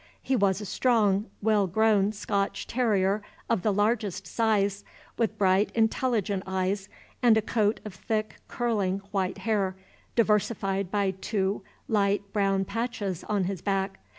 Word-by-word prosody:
He 265 - +1
was 200 -4 +2
a 210 - -6
strong, 210 -1 +2 0.2
well 210 -2 +3
grown 210 +1 +3
Scotch 200 -1 -2
terrier 210 -4 +1 0.3
of 230 -5 +1
the 210 - +2
largest 205 -2 0
size, 205 -1 +1 0.3
with 230 - -1
bright, 190 +1 +3
intelligent 220 -3 +1
eyes, 190 +1 -1 0.3
and 235 -3 +6
a - - +3
coat 215 -1 +1
of 210 - -6
thick 215 0 -3
curling 210 -6 0
white 190 -3 -1
hair, 200 -4 0 0.4
diversified 200 -4 +1
by 200 -1 +1
two 190 +1 -2 0.3
light 200 -1 +1
brown 195 -2 +1
patches 220 -5 -3
on 205 -2 0
his 185 -2 -3
back. 195 -1 -1
205 Hz, 140 wpm, -27 LUFS, 195-220 Hz, 0.4 s, and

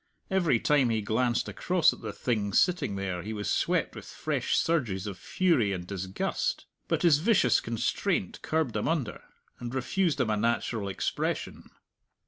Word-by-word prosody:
Every 175 -11 +3
time 140 -2 +3
he 110 -1 +1
glanced 120 +3 0
across 180 -2 +2
at - - -13
the 110 -2 -4
thing 105 -2 -1
sitting 180 - +2
there 95 -2 -3
he 110 +4 -5
was 105 -1 -4
swept - - 0
with - - -9
fresh - - -1
surges 115 - 0
of 100 -2 -4
fury 130 - +1
and 90 -2 -5
disgust. 95 0 -2 0.2
But - - 0
his 160 -5 +5
vicious 180 - +4
constraint 115 -1 -1
curbed 155 -6 0
them - - -1
under, 155 -8 -1 0.4
and 120 +1 -5
refused 160 +6 0
them 125 -5 +1
a 105 - +1
natural 110 -1 0
expression. 95 - -3
120 Hz, 160 wpm, -28 LUFS, 100-155 Hz, 0.4 s, his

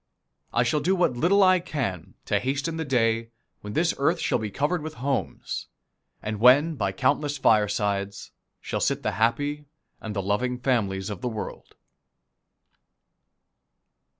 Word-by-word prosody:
I 120 - +2
shall 120 +5 +1
do 185 +6 +1
what 175 -8 +2
little 185 +10 +4
I 185 -1 +5
can 130 - -4
to - - +1
hasten 140 +5 -2
the 160 - -2
day 115 -3 +1 0.3
when 105 0 -8
this 165 +2 +2
earth 140 - +2
shall - - +1
be 110 -1 -3
covered 150 - -1
with 155 +1 -6
homes, 135 0 -3 0.6
and 110 -1 -3
when 140 +8 +6
by 100 -9 -1
countless 145 +7 0
firesides 100 -4 +1 0.3
shall - - -3
sit - - 0
the - - 0
happy 145 +8 0 0.4
and 110 -1 -6
the 100 - -1
loving 125 +6 0
families 105 -7 0
of 100 - -6
the 125 - -1
world. 110 -2 -7
125 Hz, 150 wpm, -26 LUFS, 105-150 Hz, 0.6 s, when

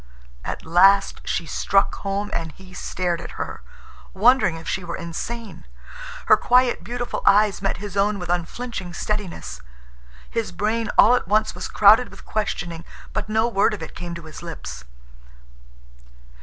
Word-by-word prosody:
At - - -5
last 195 +4 +4
she 170 - -1
struck 195 +4 +2
home 200 +1 -3
and 165 -2 -3
he 185 -1 -15
stared 175 -1 -2
at - - -9
her, - - -5 0.5
wondering 225 -3 +4
if 165 0 -9
she 190 - -2
were 170 -1 -4
insane. 210 +7 -6 0.6
Her - - +7
quiet, 250 0 +3
beautiful 245 0 -4
eyes 205 0 +4
met 195 - -1
his 200 0 -7
own 200 +1 +2
with 180 -2 -6
unflinching 180 +2 -3
steadiness. 185 - -4 0.7
His 230 -2 -3
brain 220 +1 -1
all 235 - +8
at 250 - +1
once 215 +2 +2
was - - -5
crowded 220 +4 +6
with - - -14
questioning, 175 -6 -3 0.3
but 215 0 -3
no 220 +2 +2
word 215 -1 +2
of - - -8
it - - -8
came 175 -1 -6
to 170 - -9
his 155 -1 -10
lips. 65 - -8
195 Hz, 155 wpm, -23 LUFS, 175-215 Hz, 0.7 s, all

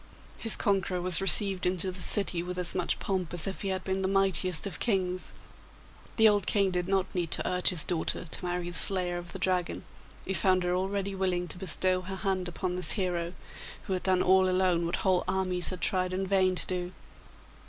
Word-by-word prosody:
His 225 - +2
conqueror 190 -2 -1
was 180 0 +2
received 195 0 +5
into 185 +1 -1
the 180 0 -8
city 185 -4 +3
with 180 +1 -6
as 180 -1 -2
much 180 -2 -1
pomp 185 -4 -3
as 165 - +1
if 195 - -5
he 200 - -4
had 190 -1 -3
been 190 0 -2
the 190 - 0
mightiest 190 -3 +1
of 200 - -6
kings. 185 -5 -1 0.8
The 220 -1 +5
old 205 -3 +1
King 200 -2 +2
did 180 -1 -2
not 190 -1 -1
need 175 -3 -2
to - - -1
urge 180 0 +2
his 175 -5 +5
daughter 175 0 -2
to 175 - -3
marry 175 0 -3
the 175 - -1
slayer 180 -2 +3
of 175 0 -9
the - - -7
Dragon; 185 -2 -2 0.4
he 190 - -3
found 185 +1 +2
her 180 0 -1
already 195 +2 -2
willing 185 -2 -2
to 180 - -7
bestow 185 0 +2
her 190 +1 -7
hand 190 -2 -2
upon 180 +1 -4
this 180 - +4
hero, 175 -4 -2 0.5
who 190 - -4
had 185 - -2
done 185 -1 +1
all 185 0 +3
alone 180 -2 +1
what 170 - -2
whole 185 -2 +2
armies 185 -2 -1
had 185 -2 -6
tried 185 -2 0
in 190 +1 -2
vain 190 -1 +1
to - - -1
do. 180 0 -4
185 Hz, 215 wpm, -28 LUFS, 180-190 Hz, 0.8 s, received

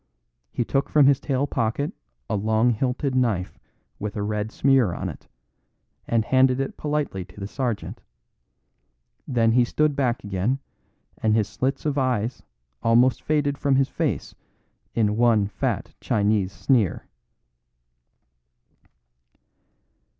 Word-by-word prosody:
He 120 - -1
took 135 +3 0
from 150 -2 +5
his 140 0 +5
tail 140 -1 0
pocket 125 +2 -1 0.3
a - - -1
long 110 +4 +2
horn - - +1
hilted 130 +1 -1
knife 115 -8 0 0.4
with 105 0 -4
a 105 - -2
red 105 +1 -2
smear 130 -10 +3
on - - -3
it, - - -11 0.8
and 115 -1 +1
handed 130 0 +3
it 135 - -3
politely 150 -10 -2
to 90 +2 -15
the 100 - -4
sergeant. 120 0 -3 1.3
Then 115 -3 +2
he 125 +1 +4
stood 150 +4 +1
back 125 -4 0
again, 100 +6 -1 0.6
and 110 -1 +3
his 110 -3 +2
slits 130 +7 -2
of 145 -2 0
eyes 125 -2 -1 0.4
almost 120 +2 +3
faded 145 -2 0
from 140 -1 +2
his 135 0 +2
face - - -2 0.6
in 105 -2 +1
one 115 -3 +4
fat 100 - -3
Chinese 100 -2 +1
sneer. 115 -5 +1
120 Hz, 130 wpm, -24 LUFS, 105-135 Hz, 1.3 s, from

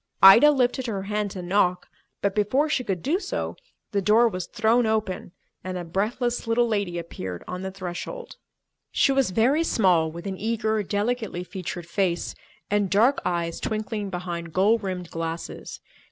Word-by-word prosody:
Ida 225 +10 +10
lifted 260 -2 +1
her 200 -4 -3
hand 210 +1 -1
to 185 -2 -7
knock, 180 -1 +1 0.4
but 200 -1 +2
before 235 +9 +2
she 270 -4 0
could 190 -7 -3
do 335 +7 +1
so, 380 -1 -3 0.4
the 200 -2 +1
door 215 +5 +5
was 185 -5 -4
thrown 230 +1 +2
open 215 -5 -1 0.3
and 185 0 -4
a 175 - -4
breathless 225 +8 -1
little 235 +1 +3
lady 200 -6 -1
appeared 95 - -6
on 180 0 -5
the 190 - -3
threshold. 190 - -7 0.5
She 275 - +3
was 270 -4 +2
very 250 - +3
small, 180 - +3
with 170 +3 -9
an 190 -1 -4
eager, 220 0 0
delicately 205 -1 -2
featured 180 -2 -6
face 175 0 -1 0.3
and 205 -1 +1
dark 230 +9 +4
eyes 170 -2 -1
twinkling 215 -1 -3
behind 175 -2 -5
gold 205 +5 +3
rimmed 185 -3 -4
glasses. 165 0 -5
200 Hz, 165 wpm, -25 LUFS, 180-230 Hz, 0.5 s, Ida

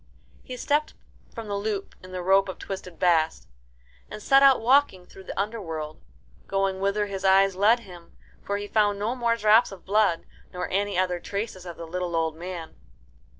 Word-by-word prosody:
He 255 - -8
stepped 295 +4 0 0.4
from 230 -2 -8
the 205 - -4
loop 200 -1 -3
in 185 - -11
the 180 -1 -5
rope 195 +1 +3
of 185 - -6
twisted 185 -3 -7
bast, 165 -3 +1 0.6
and - - -7
set 270 +6 +4
out 275 -1 +6
walking 240 -6 +3
through 190 +1 -15
the - - -6
underworld, 165 -8 -4 0.5
going 195 -1 0
whither 200 +2 0
his 195 -2 -6
eyes 195 0 +4
led 220 +5 +4
him, 180 -5 -14 0.2
for 200 - -2
he 205 0 -5
found 205 -1 +2
no 215 +5 -2
more 235 -2 +1
drops 220 0 +4
of 195 -3 -12
blood, 200 -4 +2 0.3
nor 180 0 -4
any 200 0 0
other 180 -1 0
traces 200 -1 -5
of 170 - -8
the 165 - -7
little 175 +1 -3
old 160 -1 0
man. 170 -1 -7
195 Hz, 185 wpm, -25 LUFS, 180-215 Hz, 0.6 s, out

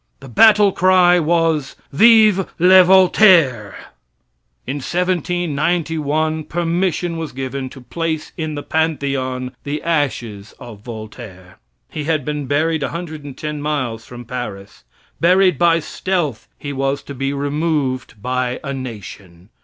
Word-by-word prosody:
The 135 - -12
battlecry 185 - +5
was, 160 -3 0 0.2
"Vive 215 +1 +5
le 185 +2 +7
Voltaire!" 175 - +4 0.9
In 135 +3 -4
1791 160 -2 -1
permission 175 0 -1
was 160 -2 -5
given 130 0 -5
to 130 - -13
place 160 +3 -4
in 155 -2 -4
the 145 - -5
Pantheon 135 -5 -2
the 145 +1 -4
ashes 120 -10 -2
of 115 -4 -11
Voltaire. 110 -5 -10 0.3
He 150 -2 -5
had 155 -4 -1
been 150 -2 -4
buried 155 +3 0
110 150 -2 -6
miles 130 -7 -3
from 120 0 -11
Paris. 105 - -7 0.4
Buried 180 -2 +3
by 170 -1 +4
stealth 165 - -3
he 145 -1 -6
was 135 +1 -2
to 140 - -8
be 135 +1 -2
removed 140 -4 -2
by 125 0 -2
a 140 -2 -4
nation. 100 -8 -9
150 Hz, 120 wpm, -18 LUFS, 130-170 Hz, 0.9 s, le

